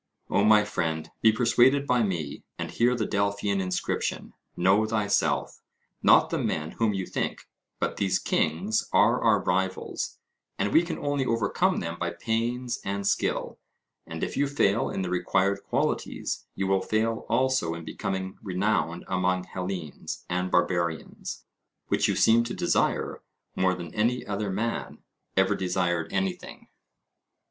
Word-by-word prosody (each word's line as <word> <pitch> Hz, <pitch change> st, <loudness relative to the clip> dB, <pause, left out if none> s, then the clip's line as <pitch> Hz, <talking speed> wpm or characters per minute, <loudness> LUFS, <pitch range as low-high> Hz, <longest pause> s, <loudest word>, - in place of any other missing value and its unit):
O 100 Hz, -, +3 dB
my 105 Hz, 0 st, +6 dB
friend, 80 Hz, -6 st, -2 dB
be 110 Hz, -, +6 dB
persuaded 125 Hz, +4 st, +4 dB
by 125 Hz, -3 st, +2 dB
me, 85 Hz, -9 st, -2 dB
and -, -, -4 dB
hear 120 Hz, +1 st, +2 dB
the -, -, -1 dB
Delphian 100 Hz, -1 st, 0 dB
inscription, 90 Hz, -1 st, -2 dB, 0.2 s
'Know 95 Hz, +5 st, +4 dB
thyself' 105 Hz, -2 st, 0 dB, 0.4 s
not -, -, +5 dB
the -, -, 0 dB
men 75 Hz, +1 st, -2 dB
whom 110 Hz, -3 st, 0 dB
you 95 Hz, -1 st, -2 dB
think, -, -, -3 dB, 0.3 s
but -, -, -1 dB
these 95 Hz, -2 st, +2 dB
kings 95 Hz, +8 st, 0 dB
are 105 Hz, +6 st, +4 dB
our 110 Hz, -3 st, +4 dB
rivals, 95 Hz, +1 st, -1 dB, 0.4 s
and 105 Hz, -, 0 dB
we 160 Hz, -, +7 dB
can 175 Hz, 0 st, -4 dB
only 145 Hz, -1 st, 0 dB
overcome 115 Hz, -3 st, +1 dB
them 85 Hz, +1 st, -5 dB
by 85 Hz, -, -1 dB
pains 120 Hz, +6 st, -2 dB
and 100 Hz, 0 st, -3 dB
skill. -, -, 0 dB, 0.5 s
And -, -, -5 dB
if -, -, -3 dB
you 145 Hz, -, +2 dB
fail 115 Hz, -7 st, +2 dB
in 95 Hz, -, -2 dB
the 90 Hz, -, -3 dB
required 95 Hz, +2 st, +1 dB
qualities, -, -, -2 dB
you 95 Hz, -, -1 dB
will 95 Hz, 0 st, +2 dB
fail 110 Hz, +3 st, -1 dB
also 125 Hz, -9 st, +1 dB
in 85 Hz, -1 st, -8 dB
becoming 95 Hz, -2 st, -4 dB
renowned 95 Hz, -3 st, -1 dB
among 90 Hz, 0 st, +1 dB
Hellenes 90 Hz, -4 st, -5 dB
and 90 Hz, +1 st, -1 dB
Barbarians, 85 Hz, -2 st, -1 dB, 0.5 s
which -, -, +2 dB
you -, -, +1 dB
seem 115 Hz, +1 st, +5 dB
to 120 Hz, -, -4 dB
desire -, -, 0 dB, 0.3 s
more 95 Hz, 0 st, +2 dB
than 85 Hz, -3 st, -8 dB
any 120 Hz, +4 st, 0 dB
other 100 Hz, 0 st, -2 dB
man 110 Hz, +5 st, -3 dB, 0.3 s
ever -, -, +4 dB
desired 90 Hz, -3 st, -1 dB
anything. 95 Hz, -1 st, -3 dB
100 Hz, 150 wpm, -27 LUFS, 90-115 Hz, 0.5 s, we